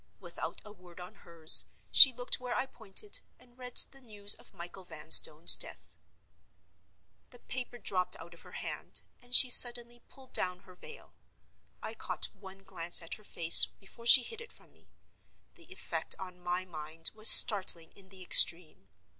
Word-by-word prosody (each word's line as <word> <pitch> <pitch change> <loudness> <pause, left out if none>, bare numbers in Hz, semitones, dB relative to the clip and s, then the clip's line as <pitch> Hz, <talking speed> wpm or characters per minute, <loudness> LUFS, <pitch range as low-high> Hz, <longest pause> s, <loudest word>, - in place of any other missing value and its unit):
Without - - -10
a 210 - -16
word 180 -3 -21
on 180 0 -15
hers, 165 -2 -4 0.3
she 265 - +7
looked 245 0 -7
where 250 -1 -9
I 255 - -5
pointed, 235 - -4 0.2
and 245 -1 -28
read 250 -1 -12
the 270 - -19
news 205 -4 -1
of - - -14
Michael 175 +2 -14
Vanstone's 160 -1 +3
death. - - -8 1.3
The 245 - -20
paper 245 0 -11
dropped 185 -5 -6
out 170 - -16
of 170 - -17
her - - -19
hand, - - -8 0.2
and 245 0 -5
she 255 - +6
suddenly 240 0 +2
pulled 265 -1 -22
down 180 0 -2
her 185 - -21
veil. 455 - -17 0.7
I 220 - -9
caught 225 - -4
one 195 -1 -18
glance 170 -1 -1
at 165 - -7
her 215 - -11
face 170 -4 +5
before 235 +4 -16
she 250 +1 +7
hid 455 - -10
it 465 - -15
from - - -20
me. - - -32 0.6
The - - -23
effect - - -7
on 180 -1 -14
my 180 +1 -7
mind 160 -1 -8
was 215 +1 -1
startling 185 -5 +5
in 190 -1 -19
the 190 -1 -14
extreme. 165 - +3
195 Hz, 170 wpm, -27 LUFS, 175-240 Hz, 1.3 s, she